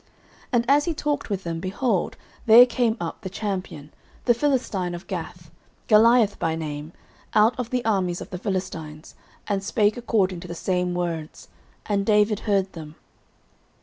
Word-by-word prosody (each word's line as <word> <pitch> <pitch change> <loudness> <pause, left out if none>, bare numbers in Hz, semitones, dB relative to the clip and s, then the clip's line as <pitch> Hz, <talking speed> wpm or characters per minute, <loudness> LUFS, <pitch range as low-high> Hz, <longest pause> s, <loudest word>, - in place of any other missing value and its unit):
09:017:023 - - -34 0.4
And 235 -1 +3
as 285 +2 +4
he 340 - -1
talked 290 -3 -2
with 195 -2 -2
them, 165 -1 -4
behold, 190 +2 -1 0.3
there 230 +3 +10
came 240 -2 0
up 170 -1 -5
the 190 - -5
champion, 185 -7 -5 0.3
the 240 - +5
Philistine 230 -9 -1
of 175 - -9
Gath, 170 -2 -7 0.4
Goliath 225 0 +5
by 160 -1 0
name, 150 -1 -5 0.4
out 215 +3 +5
of 240 -2 -3
the 250 -2 -2
armies 185 -5 0
of - - -9
the 180 - -5
Philistines, 165 -6 -5 0.3
and 200 -2 -1
spake 210 +1 +1
according 200 -7 0
to 180 - -9
the 170 - -6
same 180 0 -1
words: 165 -3 -4 0.4
and 200 -1 0
David 210 0 +3
heard 195 -3 0
them. 155 -2 -9
195 Hz, 165 wpm, -24 LUFS, 175-225 Hz, 0.4 s, there